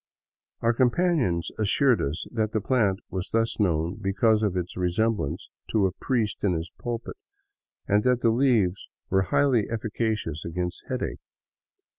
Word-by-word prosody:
Our 115 +1 +3
companions 125 - +1
assured 120 +4 +3
us 70 +4 -2
that 110 -3 -1
the 110 - +2
plant 105 -4 +1
was 95 0 -3
thus 115 0 0
known 85 -1 0
because 105 +3 +2
of 100 -4 0
its 90 -1 -3
resemblance 90 -3 -1 0.2
to 105 -3 +2
a 95 - +1
priest 110 +2 -2
in 100 -3 +3
his 80 0 -4
pulpit, 120 - -5 0.7
and 105 +1 +3
that 125 +1 +2
the 115 - +4
leaves 115 -7 +2 0.2
were 95 0 +4
highly 120 +2 +2
efficacious 110 -7 -2
against 90 +1 -4
headache. - - -3
105 Hz, 145 wpm, -26 LUFS, 90-115 Hz, 0.7 s, the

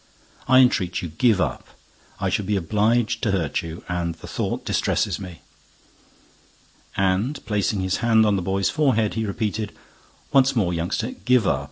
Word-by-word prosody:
I 130 +1 +7
entreat 95 -9 +1
you, 85 - -4
give 110 +5 +2
up—I - - -5
should 100 - -1
be 105 - +1
obliged 105 +5 +1
to 115 - 0
hurt 85 -7 0
you; 80 0 -8
and 85 -1 -2
the - - -13
thought - - -3
distresses - - 0
me." 90 -4 -9 1.5
And, 95 +9 +1
placing 105 -1 0
his 95 0 0
hand 115 -2 +4
on 105 -1 +3
the 95 - -1
boy's 95 +2 0
forehead, 130 -8 +1
he 110 -1 -2
repeated, 105 +1 -3 0.6
"Once 135 0 +4
more, 95 -7 +1
youngster, 85 +1 -2
give 125 -4 +1
up. - - +2
105 Hz, 160 wpm, -23 LUFS, 90-115 Hz, 1.5 s, I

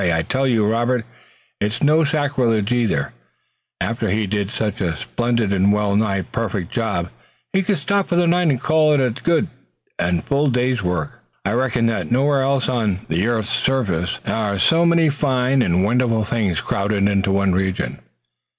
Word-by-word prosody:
I 85 -3 +1
tell 135 +10 0
you, 115 -4 +2
Robert 120 +2 0
and 105 - -8
it's 110 +7 -4
no 155 +2 +4
sacrilege 135 -8 0
either 115 - 0 0.7
after 115 -2 -2
He 105 +3 0
did 100 0 -2
such 105 -2 -3
a 85 -3 -1
splendid 115 - -1
and 95 +1 +3
well 105 -1 +1
nigh 100 -3 +1
perfect 100 -2 -4
job 100 -7 -2 0.4
He 190 - +3
could 195 +1 0
stop 200 +7 0
for 175 - +1
the 175 0 +3
night 175 +1 +2
and 130 -4 +1
call 155 +2 +3
it - - +2
a 130 -2 +1
good 165 +8 0 0.5
and 85 -1 0
full 140 +1 +1
day's 125 -1 0
work. 90 -5 -3 0.3
I 100 - 0
reckon 120 0 +1
that 100 -8 -1
nowhere 135 +2 +2
else 135 0 +1
on 110 -7 -1
the 85 +7 0
earth's 115 -2 -1
surface 95 -10 0
are 105 -3 -1
so 165 - +3
many 165 -2 +3
fine 130 -2 +1
and 90 -4 +2
wonderful 115 0 +1
things 105 -7 -1
crowded 100 0 0
into 100 -1 +1
one 100 -1 +2
region." 95 -9 -2
115 Hz, 180 wpm, -20 LUFS, 100-135 Hz, 0.7 s, no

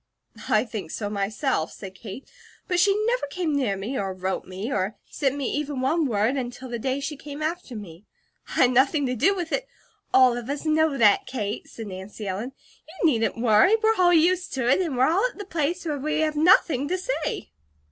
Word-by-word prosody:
"I - - +3
think 210 -8 -6
so 205 +2 -4
myself," 205 - -1
said 195 -2 -9
Kate. 205 +6 -9 0.4
"But 360 -2 +1
she 395 +2 +4
never 480 -8 0
came 320 +1 -2
near 235 -9 0
me, 225 +8 -3
or 195 -2 -3
wrote 185 +1 -3
me, 195 +8 -5
or 195 0 -1
sent 275 -2 0
me 275 -3 -2
even 290 -2 -2
one 300 +4 +1
word, 225 +3 +1
until 250 0 -5
the 235 -1 -4
day 260 +3 -1
she 280 +2 -4
came 290 +1 -7
after 320 -5 -3
me. 195 -2 -10 0.4
I - - -1
had 250 - +5
nothing 270 +3 +3
to 255 -1 -1
do 390 - +3
with 350 -3 -4
it - - -1 0.2
" - - -42
"All 255 -2 +6
of 240 +1 -6
us 285 +2 -3
know 310 -2 +2
that, 210 -4 +4
Kate," 210 -5 -4
said 225 - -8
Nancy 195 +2 -7
Ellen. 210 +8 -4 0.3
"You 340 +2 -4
needn't 230 -5 +1
worry. 230 - +5
We're 445 0 +3
all 365 -4 +4
used 355 +2 +3
to 260 -3 -1
it, 275 +9 +4
and 315 -8 -2
we're 260 +1 +4
all 350 +7 +2
at - - -1
the 410 - -6
place 340 0 -2
where 300 -3 -2
we 305 +2 -1
have 310 -1 0
nothing 305 -4 +4
to 365 +4 0
say." 320 - -3
270 Hz, 220 wpm, -25 LUFS, 220-320 Hz, 0.4 s, All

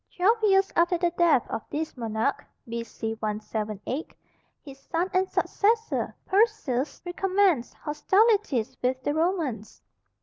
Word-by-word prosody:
Twelve 425 +6 +3
years 390 -2 +3
after 345 +1 +3
the 345 0 +1
death 340 -7 +3
of 225 - -3
this 310 +2 -3
monarch 225 +2 -1 0.2
(B.C. 230 -1 -4
178), 215 +5 -4 0.5
his 275 -2 -11
son 340 +6 -2
and 375 +1 +2
successor, 445 +2 0
Perseus, 375 - +1
recommenced 370 -6 +1
hostilities 380 - +1
with 255 +1 -1
the 290 - 0
Romans. 315 - -2
315 Hz, 115 wpm, -26 LUFS, 240-380 Hz, 0.5 s, Twelve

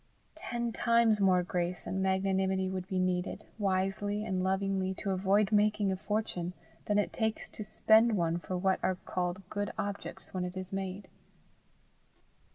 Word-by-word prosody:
Ten 235 -1 -3
times 230 -2 +3
more 185 -2 +4
grace 175 0 -2
and 190 - -2
magnanimity 190 0 +1
would 185 -1 -4
be 190 -2 -2
needed, 185 0 -1
wisely 205 +2 0
and 185 -1 -1
lovingly 190 0 0
to 195 - -3
avoid 195 +2 +2
making 210 -1 +3
a - - 0
fortune, 190 -3 -2 0.3
than 210 - +1
it 205 - +1
takes 220 -1 -1
to 215 - -7
spend 220 +1 +4
one 170 -1 +1
for 185 +1 -4
what 190 +1 +2
are 185 - +1
called 180 +1 -3
good 205 -1 -2
objects 200 -2 -5
when 185 -1 -1
it 180 +1 -5
is 185 0 -4
made. 195 +1 -4
190 Hz, 160 wpm, -31 LUFS, 185-205 Hz, 0.3 s, more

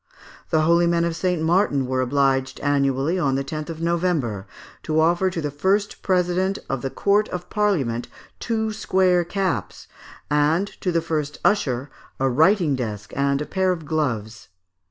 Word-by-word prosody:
The 160 - +3
holy 170 +2 +4
men 170 0 +2
of 170 -1 -2
St. 180 0 0
Martin 160 -5 +2
were 130 0 -1
obliged, 135 0 +1
annually, 140 +4 +1
on 135 -5 +1
the 135 - -1
10th 155 +3 -5
of 165 -1 -6
November, 165 - -1 0.3
to 155 0 0
offer 175 +4 +3
to 175 -2 -4
the 150 -1 -3
first 195 +8 0
President 185 +1 +1
of 135 -2 -3
the 135 - -2
Court 205 +8 +1
of 180 0 -6
Parliament, 150 - 0 0.3
two 220 -2 -1
square 185 -4 +2
caps, 175 - -3 0.4
and 150 +5 +2 0.2
to 180 - 0
the 170 -1 +1
first 155 -3 -3
usher, 140 - +1 0.3
a 135 - +2
writing 160 - +3
desk 105 -5 -5
and 140 +1 +1
a - - -7
pair 190 +2 0
of 165 -4 -4
gloves. 120 -9 -2
160 Hz, 165 wpm, -23 LUFS, 135-180 Hz, 0.4 s, holy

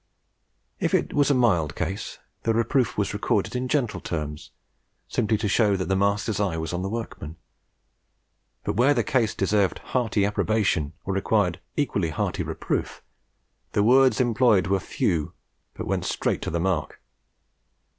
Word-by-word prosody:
If - - +1
it - - 0
was 145 0 +3
a 140 - +4
mild 90 -11 +2
case, 95 - -4 0.2
the 115 -1 0
reproof 115 +3 +1
was 100 -1 0
recorded 105 +2 0
in 125 +1 -1
gentle 130 -4 0
terms, 75 -3 -5 0.6
simply 110 0 +1
to 105 - -2
show 100 0 +3
that 95 -1 -3
the 95 - +2
master's 100 +2 0
eye 95 -5 0
was 80 0 -3
on 90 - -2
the 95 - -2
workman; 110 -8 -6 1.3
but - - -2
where 135 +5 +4
the 120 - +2
case 115 -1 +1
deserved 100 -3 +1
hearty 115 -5 0
approbation 100 -7 0
or 95 - -1
required 95 -2 +1 0.2
equally 100 - 0
hearty 75 - -2
reproof, - - -3 0.7
the 100 - +3
words 130 0 +5
employed 115 -6 +3
were 95 +1 +1
few, 80 -3 -1 0.4
but - - -5
went - - -1
straight - - -1
to - - -3
the 85 - -1
mark. 85 -4 -1
105 Hz, 155 wpm, -25 LUFS, 90-115 Hz, 1.3 s, words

